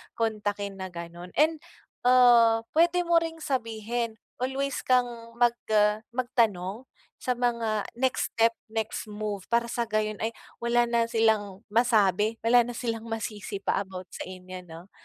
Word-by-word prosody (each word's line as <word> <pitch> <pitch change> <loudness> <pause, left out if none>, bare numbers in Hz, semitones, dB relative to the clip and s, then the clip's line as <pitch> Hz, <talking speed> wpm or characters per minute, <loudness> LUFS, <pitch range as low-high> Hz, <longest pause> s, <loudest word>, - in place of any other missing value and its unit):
kontakin," 205 -3 -2
na 190 - -4
ganun 170 +1 -8
and, 315 +1 +4 0.5
ah, 235 -3 +6
pwede 345 +2 +4
mo 340 - +3
ring 330 0 -5
sabihin, 230 -4 -2 0.2
always 265 +2 -1
kang 250 -1 +4 0.3
mag 240 -1 +4 0.2
ah 210 0 +4 0.2
magtanong 230 -5 0 0.4
sa 250 - -1
mga 235 -3 0
next 260 +1 0
step, 230 0 +4 0.2
next 220 0 -3
move, 210 -2 -4
para 235 0 +2
sa 235 - 0
gayon 215 -1 -1
ay 225 - 0 0.3
wala 240 0 +3
na 235 -1 +2
silang 220 -3 +1
masabi, 215 -2 +3
wala 245 +2 +6
na 245 - -6
silang 230 -1 -3
masisi 215 -2 -4
pa - - 0
about 185 -1 -9
sa - - -6
inyo, 185 0 -8
'no, 165 +4 -12
225 Hz, 150 wpm, -27 LUFS, 205-245 Hz, 0.5 s, ah